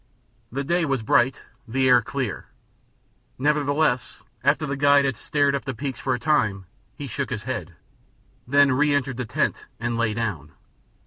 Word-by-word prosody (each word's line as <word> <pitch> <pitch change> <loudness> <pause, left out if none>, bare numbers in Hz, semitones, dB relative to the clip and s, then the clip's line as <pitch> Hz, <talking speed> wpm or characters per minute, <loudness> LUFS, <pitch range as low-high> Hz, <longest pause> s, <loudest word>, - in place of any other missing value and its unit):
The 135 +4 -2
day 170 +5 +1
was 135 -7 -1
bright, 120 +4 +2 0.2
the 130 +3 +1
air 125 -1 +6
clear, 125 -1 -4 0.9
nevertheless 145 -3 0 0.2
after 145 +3 +2
the 140 -1 -2
guide 140 0 +4
had 135 -2 0
stared 145 +5 +1
up 140 - -1
at - - -30
the 135 - -3
peaks 135 +2 -4
for 130 -2 0
a - - -6
time 110 -9 +1 0.3
he 145 - -6
shook 140 +1 -3
his 115 -5 -4
head, 90 -9 -5 0.7
then 140 +2 +5
reëntered 140 -2 +1
the 125 - -3
tent 110 - -1
and 120 0 -2
lay 110 -2 +1
down. 90 -10 -3
135 Hz, 170 wpm, -24 LUFS, 115-145 Hz, 0.9 s, air